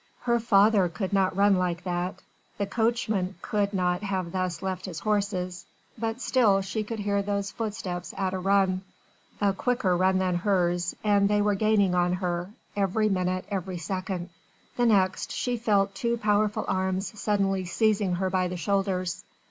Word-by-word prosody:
Her 235 Hz, -1 st, +2 dB
father 205 Hz, -4 st, +4 dB
could 190 Hz, +4 st, -4 dB
not 190 Hz, -1 st, +2 dB
run 200 Hz, -1 st, +5 dB
like 180 Hz, -1 st, -1 dB
that 180 Hz, 0 st, -3 dB, 0.3 s
the 200 Hz, -, 0 dB
coachman 220 Hz, -3 st, 0 dB
could 205 Hz, -1 st, 0 dB
not 180 Hz, -2 st, 0 dB
have 190 Hz, -4 st, -2 dB
thus 185 Hz, -1 st, -2 dB
left 185 Hz, -1 st, -3 dB
his 180 Hz, -4 st, -6 dB
horses 200 Hz, -4 st, -1 dB, 0.3 s
but 225 Hz, +1 st, -3 dB
still 215 Hz, -8 st, +3 dB
she 215 Hz, +3 st, -3 dB
could 225 Hz, +2 st, -5 dB
hear 200 Hz, -1 st, 0 dB
those 200 Hz, 0 st, -2 dB
footsteps 200 Hz, -6 st, -4 dB
at 190 Hz, -1 st, -1 dB
a 190 Hz, -, -2 dB
run 190 Hz, -1 st, +2 dB, 0.6 s
a 200 Hz, -1 st, +2 dB
quicker 225 Hz, -4 st, +1 dB
run 185 Hz, +1 st, +3 dB
than 185 Hz, -2 st, +1 dB
hers 175 Hz, -2 st, +1 dB
and 205 Hz, -1 st, +3 dB
they 210 Hz, 0 st, +3 dB
were 210 Hz, 0 st, +2 dB
gaining 200 Hz, -2 st, +2 dB
on 175 Hz, 0 st, +2 dB
her 180 Hz, -1 st, -2 dB, 0.3 s
every 205 Hz, +2 st, +1 dB
minute, 185 Hz, -1 st, -1 dB
every 190 Hz, -2 st, -3 dB
second. 185 Hz, 0 st, -4 dB, 0.4 s
The 240 Hz, -1 st, +2 dB
next, 190 Hz, -4 st, +2 dB
she 245 Hz, -1 st, -1 dB
felt 205 Hz, -4 st, +1 dB
two 235 Hz, +4 st, -1 dB
powerful 210 Hz, -1 st, +1 dB
arms 190 Hz, +2 st, -1 dB
suddenly 195 Hz, -3 st, 0 dB
seizing 200 Hz, 0 st, +1 dB
her 185 Hz, +1 st, -1 dB
by 185 Hz, -1 st, +1 dB
the 180 Hz, 0 st, -4 dB
shoulders. 185 Hz, -1 st, -1 dB
195 Hz, 165 wpm, -27 LUFS, 185-210 Hz, 0.6 s, run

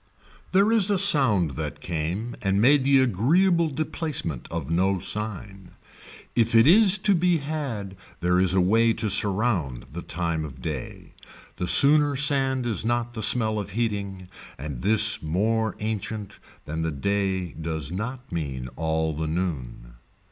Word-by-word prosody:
There 200 Hz, +4 st, +3 dB
is 215 Hz, -4 st, +3 dB
a 200 Hz, -, +2 dB
sound 135 Hz, -, +3 dB
that 65 Hz, -, -6 dB
came 90 Hz, +8 st, -4 dB
and 95 Hz, 0 st, 0 dB
made 135 Hz, +5 st, +4 dB
the 135 Hz, -1 st, +4 dB
agreeable 165 Hz, -, +2 dB
deplacement 145 Hz, -, -4 dB
of 80 Hz, -3 st, -5 dB
no 95 Hz, +3 st, +1 dB
sign. 100 Hz, 0 st, -5 dB, 0.6 s
If 115 Hz, 0 st, +2 dB
it 115 Hz, +1 st, +7 dB
is 195 Hz, +4 st, +6 dB
to 205 Hz, +1 st, +2 dB
be 175 Hz, -1 st, +2 dB
had 140 Hz, -10 st, -5 dB, 0.2 s
there 90 Hz, +1 st, +1 dB
is 95 Hz, 0 st, +2 dB
a 95 Hz, -, +4 dB
way 115 Hz, +5 st, +3 dB
to 110 Hz, -2 st, 0 dB
surround 100 Hz, -, +1 dB
the 85 Hz, -, -5 dB
time 85 Hz, -2 st, -3 dB
of 65 Hz, -4 st, -9 dB
day. 70 Hz, -2 st, -7 dB, 0.4 s
The 90 Hz, -, -3 dB
sooner 145 Hz, +3 st, +5 dB
sand 135 Hz, -2 st, +1 dB
is 115 Hz, -4 st, -1 dB
not 120 Hz, +1 st, -1 dB
the 110 Hz, -, -6 dB
smell 110 Hz, -2 st, +2 dB
of 100 Hz, -1 st, -7 dB
heating 100 Hz, -5 st, -3 dB, 0.3 s
and 70 Hz, -3 st, -7 dB
this 110 Hz, +1 st, +1 dB
more 110 Hz, +7 st, -1 dB
ancient 105 Hz, -1 st, -5 dB, 0.3 s
than 80 Hz, +2 st, -4 dB
the 80 Hz, -, -1 dB
day 95 Hz, +3 st, -2 dB
does 80 Hz, -2 st, -4 dB
not 125 Hz, +7 st, -6 dB
mean 70 Hz, -7 st, -4 dB
all 80 Hz, 0 st, -1 dB
the 80 Hz, +1 st, -3 dB
noon. 75 Hz, -8 st, -4 dB
105 Hz, 155 wpm, -24 LUFS, 85-130 Hz, 0.6 s, it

